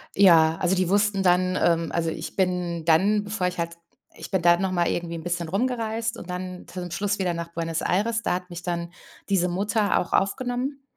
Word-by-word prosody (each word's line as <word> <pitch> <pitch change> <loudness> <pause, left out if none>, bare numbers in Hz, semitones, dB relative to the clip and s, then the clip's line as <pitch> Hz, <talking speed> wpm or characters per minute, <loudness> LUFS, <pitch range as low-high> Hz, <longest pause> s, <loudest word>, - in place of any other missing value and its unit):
Ja. 165 -4 +6
Also, 180 +1 +2
die 185 -2 0
wussten 200 0 +2
dann 185 0 +3
ähm, 165 -1 +2
also, 165 -1 0
ich - - -6
bin 180 -3 -1
dann, 200 +6 +3
bevor 200 -3 -1
ich 180 - -4
halt 170 0 -3 0.4
ich - - -8
bin 190 - +1
dann 175 +2 +4
noch 190 -1 0
mal 175 -2 +1
irgendwie 170 -1 -2
'n 160 - -7
bisschen 175 -1 -2
rumgereist. 225 +1 -1
Und 180 - -10
dann 180 0 -6
zu 185 - -7
dem 180 0 -5
Schluss 200 +2 -1
wieder 180 -2 0
nach 170 0 -5
Buenos 165 -1 -2
Aires. 220 +4 0
Da - - +1
hat 180 0 -6
mich 175 0 -8
dann 170 -1 -3 0.4
diese 180 -3 +2
Mutter 200 +3 +1
auch - - -4
aufgenommen. 250 +7 -1
180 Hz, 215 wpm, -25 LUFS, 170-200 Hz, 0.4 s, Ja